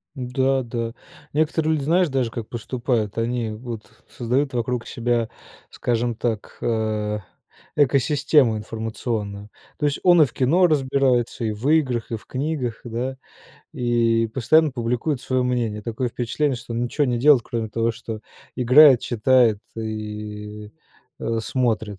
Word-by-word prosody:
Да, 130 +1 0
да. 115 -1 -4 0.4
Некоторые 155 +1 +1
люди, 150 -3 -1
знаешь, 170 +3 +3
даже 130 -4 0
как 115 -1 -6
поступают: 120 -2 -2
они 115 -1 -1
вот 115 0 -7 0.3
создают 130 +3 -1
вокруг 120 0 -2
себя, 120 -1 -1 0.4
скажем 120 0 -1
так, 110 -2 -3
э, 110 -2 -1 0.6
экосистему 140 -2 +3
информационную. 110 -1 -4 0.3
То 150 - -1
есть 145 -1 0
он 175 -2 +6
и - - +7
в 125 - -10
кино 160 +8 +3
разбирается, 130 -5 +1
и 110 - 0
в 110 +7 -2
играх, 130 -8 +1
и - - 0
в - - -17
книгах, 130 -4 -3
да, 125 +3 -4 0.6
и 115 -2 +1
постоянно 150 +7 +3
публикует 125 +3 -1
свое 130 -1 0
мнение. 120 -4 -1
Такое 115 +3 -2
впечатление, 125 +4 -1
что 115 0 -8
он 115 +1 -1
ничего 145 +5 0
не 120 -2 0
делает, 140 -1 +6
кроме 115 -1 -3
того, 115 +2 0
что 115 -1 -7 0.4
играет, 130 +1 +7
читает 120 -2 +3 0.2
и, 105 -1 -6 0.5
а, 115 0 -1
смотрит. 110 -4 -1
120 Hz, 140 wpm, -23 LUFS, 115-135 Hz, 0.6 s, и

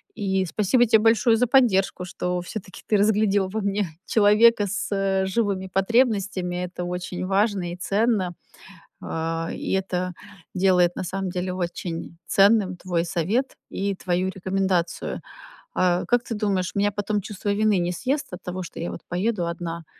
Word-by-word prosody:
И 190 -3 0
спасибо 215 +7 +2
те 220 0 +5
большое 225 +1 +4
за 250 +1 +2
поддержку, 195 -8 +3
что 180 0 -2
всё-таки 185 +1 -8
ты 215 - +2
разглядел 205 -2 +2
во 220 - -3
мне 200 -1 -1 0.2
человека 215 +1 +5
с, 200 - -3
э, 195 -1 +1
живыми 190 -1 -1
потребностями. 195 -4 +1
Это 180 0 -6
очень 180 0 -4
важно 195 -2 +1
и - - -5
ценно, 200 -1 +1 0.7
а, 165 +1 -3
и - - -4
это 185 -1 -1 0.4
делает 180 -2 +3
на - - -3
самом 190 +1 -3
деле 180 +1 -3
очень 170 -2 -5
ценным 200 -2 +4
твой 175 -2 -1
совет 200 - -1
и 200 +1 -2
твою 185 0 -1
рекомендацию. 190 -2 -1 0.5
А, 180 -1 +2
как 245 -1 +2
ты 230 - -4
думаешь, 195 -4 -1
меня 205 0 +2
потом 205 +1 -1
чувство 205 +1 -6
вины 210 -1 +2
не 175 0 0
съест 270 - -2
от 180 - -7
того, 185 +1 -5
что - - -9
я 170 - -3
вот - - -7
поеду 180 0 -1
одна 170 -1 -5
190 Hz, 160 wpm, -24 LUFS, 180-210 Hz, 0.7 s, те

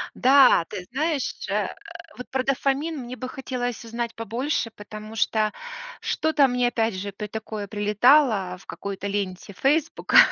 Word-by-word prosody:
Да, 260 -9 +6
ты 195 -4 -5
знаешь, 295 +1 -1
э, - - +1 0.5
вот 250 - -8
про 260 -1 0
дофамин 275 +4 0
мне 250 0 -6
бы 255 0 -6
хотелось 250 -3 -4
узнать 230 0 -4
побольше, 230 +2 -2
потому 215 +1 -10
что 215 0 +1 0.5
что-то 305 -3 +2
мне 250 -1 +1
опять 225 -3 0
же 200 +2 -4
при 210 +2 -6
такое 215 -1 -5
прилетало 210 -1 +3
в 185 - -18
какой-то 200 0 -5
ленте 200 -1 -3
"Фейсбука" 300 - +2
235 Hz, 145 wpm, -25 LUFS, 205-265 Hz, 0.5 s, Да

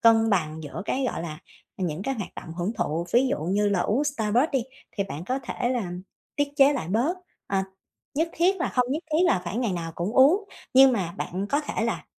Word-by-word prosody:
cân 225 -1 +5
bằng 160 -4 0
giữa 145 +5 -6
cái, 265 0 -1
gọi - - -4
là, 155 -2 -6 0.4
những 180 -1 -2
cái 270 +4 -1
hoạt 200 -6 -6
động 165 - -8
hưởng 180 +5 -2
thụ. 170 -3 -1
Ví 250 +3 +5
dụ - - 0
như 205 +3 +2
là 195 -3 +1
uống 255 +11 +1
Starbucks 245 0 +1
đi 265 -3 +2 0.3
thì 200 - -1
bạn 165 -2 -6
có 260 +5 -1
thể 240 - -2
là 235 -8 -1 0.5
tiết 290 0 +1
chế 280 0 +6
lại 240 - -3
bớt, 250 - +1 0.3
ờ, 195 -1 +1 0.5
nhất 325 +3 +1
thiết 370 +3 +2
là 350 - -1
hông 250 -1 +3
nhất 315 +4 -2
thiết 315 - +3
là 185 - +3
phải 180 +6 -4
ngày 235 -6 0
nào 165 -2 -4
cũng 180 +6 -2
uống, 305 +12 +5 0.3
nhưng 265 0 +8
mà 180 -7 -1
bạn 190 +3 -3
có 285 - +2
thể 295 - -2
là - - -2
225 Hz, 230 wpm, -26 LUFS, 180-270 Hz, 0.5 s, nhưng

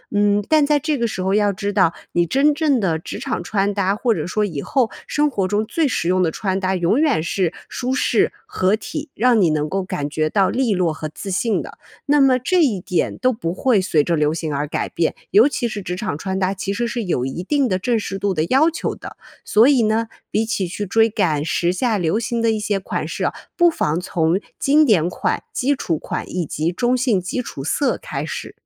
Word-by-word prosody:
嗯， 205 0 +3
但 310 -2 +4
在 295 0 +2
这 300 0 -1
个 235 - 0
时 215 - -4
候 190 +1 0
要 205 0 +3
知 200 +1 -3
道 185 -4 +3 0.2
你 175 0 +2
真 280 - +2
正 295 -4 +2
的 175 -6 0
职 160 - -7
场 - - -3
穿 200 +2 0
搭， 200 0 0
或 235 +1 +2
者 - - -3
说 210 +4 0
以 160 -8 -4
后 260 -5 +1 0.2
生 295 0 +1
活 200 -8 -1
中 205 +3 0
最 300 +6 0
实 170 - -1
用 185 +1 +2
的 165 - +1
穿 190 +2 -2
搭 190 -1 0
永 180 - +2
远 290 - +2
是 175 +1 -1
舒 255 +1 -3
适、 270 - +2 0.2
合 200 - +1
体， 295 +6 -6
让 240 -1 +3
你 175 - +4
能 150 -1 0
够 190 +5 -2
感 145 -5 -4
觉 155 +1 -1
到 195 +2 +2
俐 250 -3 +1
落 180 -4 +1
和 155 0 -6
自 200 - -7
信 210 +4 0
的。 - - -10 0.3
那 290 0 +3
么 260 -2 +4
这 345 +7 +2
一 225 -10 +1
点 180 -2 -1
都 255 0 +2
不 170 -7 -3
会 220 +1 +2
随 155 -6 +1
着 170 - +1
流 150 -1 +1
行 160 -3 -3
而 145 +1 -2
改 - - -3
变， 165 - 0 0.2
尤 215 +6 +6
其 260 -4 -1
是 210 -3 -5
职 180 0 -3
场 185 -6 -3
穿 190 +3 -3
搭， 190 +1 0
其 195 +1 -3
实 235 +3 -1
是 235 0 -3
有 170 -10 -1
一 135 +7 -4
定 280 +5 +1
的 185 - 0
正 230 +4 0
式 195 -1 -4
度 195 0 0
的 155 -2 0
要 275 - +3
求 330 - -3
的。 - - -10 0.3
所 220 +4 +5
以 270 -5 +4
呢， 220 +1 +1 0.2
比 220 - +1
起 210 -4 -1
去 195 +4 -4
追 225 +3 +4
赶 175 -10 0
时 170 +2 +1
下 215 +2 0
流 165 +3 +1
行 235 0 -2
的 230 - +2
一 220 - -1
些 210 -2 -1
款 190 - -4
式 - - -3
啊， - - 0 0.2
不 345 -1 +5
妨 165 - -1
从 170 0 0 0.2
经 295 +3 +4
典 185 - +3
款、 - - -2
基 280 +3 +1
础 165 - -2
款 - - -5
以 180 -2 -2
及 155 +3 -2
中 240 +7 +1
性 245 -6 +1
基 195 +8 -3
础 135 - -7
色 275 - 0
开 - - -4
始。 - - -6
205 Hz, 260 characters per minute, -20 LUFS, 175-245 Hz, 0.3 s, 尤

